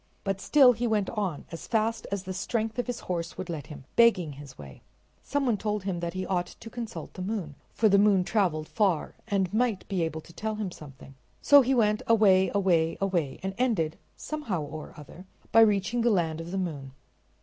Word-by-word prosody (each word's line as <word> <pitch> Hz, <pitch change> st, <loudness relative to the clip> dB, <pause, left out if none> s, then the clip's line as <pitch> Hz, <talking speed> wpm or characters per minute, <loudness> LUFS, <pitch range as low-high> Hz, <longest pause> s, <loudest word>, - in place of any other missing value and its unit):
But 195 Hz, -1 st, -2 dB
still 275 Hz, -4 st, +6 dB
he 240 Hz, +1 st, -2 dB
went 210 Hz, -3 st, 0 dB
on, 195 Hz, -9 st, -3 dB
as 165 Hz, -, -8 dB
fast 225 Hz, 0 st, 0 dB
as 200 Hz, -2 st, -2 dB
the 190 Hz, 0 st, -5 dB
strength 225 Hz, +4 st, -2 dB
of 245 Hz, -, -1 dB
his 245 Hz, -, -4 dB
horse 170 Hz, -2 st, -4 dB
would 185 Hz, -2 st, -5 dB
let 150 Hz, -5 st, -6 dB
him, 145 Hz, -3 st, -10 dB
begging 200 Hz, -9 st, +4 dB
his 140 Hz, -1 st, -11 dB
way. 70 Hz, -2 st, -12 dB, 0.4 s
Some 285 Hz, -1 st, -1 dB
one 235 Hz, -4 st, +2 dB
told 210 Hz, -1 st, -2 dB
him 190 Hz, -3 st, -2 dB
that 170 Hz, +1 st, -4 dB
he 185 Hz, 0 st, -2 dB
ought 180 Hz, -2 st, -1 dB
to 225 Hz, -, -12 dB
consult 230 Hz, -2 st, -7 dB
the 185 Hz, -, -8 dB
moon, 185 Hz, -6 st, -3 dB, 0.2 s
for 225 Hz, -, +2 dB
the 200 Hz, -1 st, +5 dB
moon 200 Hz, -2 st, +4 dB
traveled 175 Hz, -7 st, 0 dB
far 195 Hz, -7 st, 0 dB
and 195 Hz, -2 st, 0 dB
might 225 Hz, -3 st, 0 dB
be 190 Hz, -3 st, -1 dB
able 160 Hz, -1 st, -2 dB
to 170 Hz, -, -16 dB
tell 220 Hz, +3 st, -3 dB
him 210 Hz, -3 st, -4 dB
something. 140 Hz, -4 st, -12 dB, 0.3 s
So 285 Hz, 0 st, +7 dB
he 265 Hz, +1 st, +1 dB
went 210 Hz, -3 st, +2 dB
away, 195 Hz, -5 st, +5 dB
away, 175 Hz, -5 st, +2 dB
away, 175 Hz, -8 st, -1 dB
and 190 Hz, 0 st, -2 dB
ended, 200 Hz, -12 st, 0 dB, 0.2 s
somehow 230 Hz, -, -3 dB
or 155 Hz, +1 st, -8 dB
other, 165 Hz, +5 st, -12 dB, 0.2 s
by 225 Hz, -, +7 dB
reaching 215 Hz, +2 st, +3 dB
the 240 Hz, -, +3 dB
land 165 Hz, -6 st, 0 dB
of 165 Hz, -, -8 dB
the 190 Hz, -, -3 dB
moon. 145 Hz, -8 st, -4 dB
195 Hz, 210 wpm, -27 LUFS, 165-220 Hz, 0.4 s, So